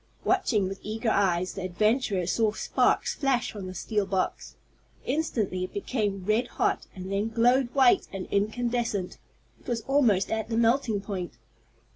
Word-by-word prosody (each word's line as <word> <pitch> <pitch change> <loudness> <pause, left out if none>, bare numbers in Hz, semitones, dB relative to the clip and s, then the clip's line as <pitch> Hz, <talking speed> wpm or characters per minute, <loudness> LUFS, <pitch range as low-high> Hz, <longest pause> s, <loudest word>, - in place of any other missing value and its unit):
Watching 210 -6 +2
with 195 +1 -6
eager 220 +2 -2
eyes, 185 -3 +1
the 195 - -6
adventurers 190 0 +1
saw 220 -2 +1
sparks - - +1
flash 270 -3 0
from 200 -3 -7
the 185 - -7
steel 210 +1 -1
box. 190 -1 -2 0.5
Instantly 230 -10 -1
it 185 - -13
became 200 -3 -2
red 220 +4 +2
hot, - - -1
and 190 +1 -7
then 200 +3 0
glowed 240 +2 +3
white 365 +8 +5
and 195 -2 -5
incandescent. 220 -1 -1 0.4
It - - -22
was 235 -2 -1
almost 235 -7 +2
at 220 0 -2
the 225 - -1
melting 230 -2 +2
point. 190 -4 -5
215 Hz, 155 wpm, -27 LUFS, 195-240 Hz, 0.5 s, white